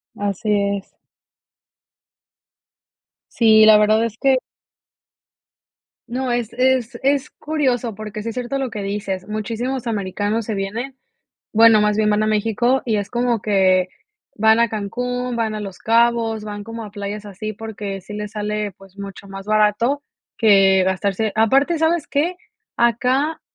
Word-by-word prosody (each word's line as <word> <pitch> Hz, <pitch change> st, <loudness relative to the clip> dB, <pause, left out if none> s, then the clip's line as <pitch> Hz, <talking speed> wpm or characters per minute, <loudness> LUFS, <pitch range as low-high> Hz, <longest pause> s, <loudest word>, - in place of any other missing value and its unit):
Así 205 Hz, +2 st, -2 dB, 0.3 s
es. 195 Hz, -, -14 dB, 2.4 s
Sí, 220 Hz, -2 st, +6 dB
la 215 Hz, -1 st, +8 dB
verdad 215 Hz, +1 st, +3 dB
es 230 Hz, -1 st, -3 dB
que 265 Hz, -1 st, +3 dB, 1.7 s
no, 250 Hz, +1 st, -2 dB
es 240 Hz, -2 st, -2 dB
es 255 Hz, -1 st, +1 dB
es 275 Hz, 0 st, +1 dB
curioso, 255 Hz, -7 st, -1 dB
porque, 215 Hz, 0 st, -7 dB
sí 230 Hz, -, -3 dB
es 225 Hz, -, -7 dB
cierto 250 Hz, +2 st, -3 dB
lo 265 Hz, -2 st, -2 dB
que 210 Hz, -2 st, -6 dB
dices. 195 Hz, -2 st, -4 dB
Muchísimos 235 Hz, +4 st, -3 dB
americanos 205 Hz, +1 st, -2 dB
se 220 Hz, -, -3 dB
vienen, 230 Hz, +7 st, -4 dB, 0.6 s
bueno, 225 Hz, -1 st, +6 dB
más 210 Hz, 0 st, +2 dB
bien 215 Hz, -1 st, +2 dB
van 210 Hz, +1 st, +2 dB
a -, -, +1 dB
México, 225 Hz, +4 st, +1 dB
y 220 Hz, -3 st, +1 dB
es 200 Hz, 0 st, -3 dB
como 240 Hz, -2 st, 0 dB
que 185 Hz, -3 st, +2 dB, 0.5 s
van 220 Hz, +1 st, +4 dB
a 235 Hz, -2 st, +3 dB
Cancún, 245 Hz, +4 st, -3 dB
van 225 Hz, -2 st, -1 dB
a 215 Hz, -, -4 dB
Los 195 Hz, -3 st, -7 dB
Cabos, 230 Hz, -1 st, +2 dB
van 205 Hz, -1 st, -6 dB
como 230 Hz, 0 st, -7 dB
a 205 Hz, -, -11 dB
playas 205 Hz, 0 st, -6 dB
así 205 Hz, +2 st, -6 dB
porque, 205 Hz, -2 st, -6 dB
sí 200 Hz, +3 st, -10 dB
les 210 Hz, 0 st, -5 dB
sale, 210 Hz, -1 st, -3 dB
pues, 195 Hz, +1 st, -19 dB
mucho 200 Hz, 0 st, -9 dB
más 195 Hz, 0 st, -9 dB
barato 215 Hz, +6 st, +2 dB, 0.4 s
que 195 Hz, -4 st, +5 dB
gastarse 195 Hz, +3 st, 0 dB
aparte, 270 Hz, +9 st, +3 dB
¿sabes 320 Hz, 0 st, +1 dB
qué? 325 Hz, +6 st, 0 dB, 0.4 s
acá 255 Hz, +6 st, +1 dB
220 Hz, 150 wpm, -20 LUFS, 205-240 Hz, 2.4 s, la